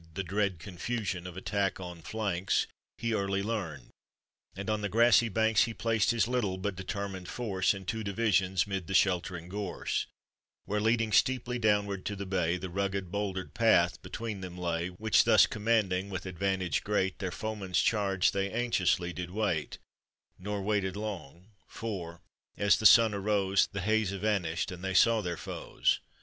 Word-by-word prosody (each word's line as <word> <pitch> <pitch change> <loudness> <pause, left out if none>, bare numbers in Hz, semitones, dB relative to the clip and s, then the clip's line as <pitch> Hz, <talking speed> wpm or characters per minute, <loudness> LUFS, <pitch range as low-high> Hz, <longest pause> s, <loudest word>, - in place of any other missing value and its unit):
The 95 - -2
dread 100 0 -1
confusion 95 +1 -4
of 90 0 -9
attack 95 0 -1
on 90 -2 -8
flanks 100 -2 -1 0.3
He 115 -1 -1
early 100 -1 0
learned, 90 - -4 0.6
and 100 +3 -6
on 110 -1 0
the 105 - -2
grassy 115 +2 +5
banks 110 0 +3
He 115 -1 -6
placed 115 -2 +1
his 115 -2 +2
little 115 -7 -1
but 95 +1 -3
determined 95 -1 -5
force 100 -6 0
In 95 -1 -9
two 110 +4 -3
divisions 95 -3 +1
'mid 95 -4 -4
the 95 - -2
sheltering 90 -2 +1
gorse, 100 -1 -3 0.6
Where, 105 +1 -1
leading 115 0 +2
steeply 125 0 +2
downward 105 -3 +1
to 105 - -3
the 100 0 -5
bay, 90 -2 0
The 90 0 -6
rugged, 95 -1 -2
bouldered 95 -2 -3
path 90 -7 +3
between 100 +2 -5
them 90 -1 -7
lay, 85 -1 -1
Which 105 +5 +2
thus - - +6
commanding, 105 -4 0
with 95 -2 -5
advantage 95 -2 -1
great, 95 -2 0
Their 95 - -2
foemen's 95 -2 -2
charge 95 -2 +2
they 100 0 -1
anxiously 95 -7 +1
did 90 0 -5
wait; 95 -6 -1 0.6
Nor 100 +1 -4
waited 100 -2 0
long, 95 -3 -7 0.2
for, 90 -7 -6 0.4
as 100 0 +4
the 110 - +8
sun 115 -1 +7
arose, 100 -1 +2
The 100 - -4
haze 110 +1 +1
evanished, 95 -5 -1
and 90 0 -8
they 95 -1 -2
saw 115 +3 +5
their 90 -3 -3
foes. - - -1
100 Hz, 165 wpm, -30 LUFS, 90-110 Hz, 0.6 s, the